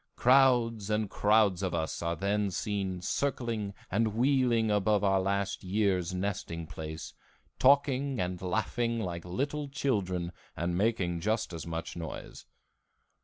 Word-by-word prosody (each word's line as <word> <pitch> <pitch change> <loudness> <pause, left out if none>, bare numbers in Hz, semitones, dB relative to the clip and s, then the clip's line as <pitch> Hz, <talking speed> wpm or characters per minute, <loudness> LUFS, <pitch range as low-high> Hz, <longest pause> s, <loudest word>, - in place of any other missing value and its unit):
Crowds 120 -5 +4
and 105 -1 0
crowds 105 -3 +3
of 95 -3 -1
us 80 - -2
are 85 0 -1
then 100 +2 0
seen 95 -1 -2
circling 115 -4 -1 0.2
and 110 +2 +1
wheeling 120 -3 +3
above 105 0 +2
our 95 -1 +3
last 100 +1 -1
year's 95 -2 +1
nesting 90 -3 -3
place, 80 0 -7 0.5
talking 140 -1 +3
and 90 0 -2
laughing 115 +5 -1
like 85 -5 -4
little 140 +10 -2
children 95 -11 -1 0.3
and 85 +1 -1
making 95 -4 +1
just 110 0 -1
as 85 0 -6
much 80 0 -4
noise. 85 -2 -7
100 Hz, 130 wpm, -30 LUFS, 90-115 Hz, 0.5 s, Crowds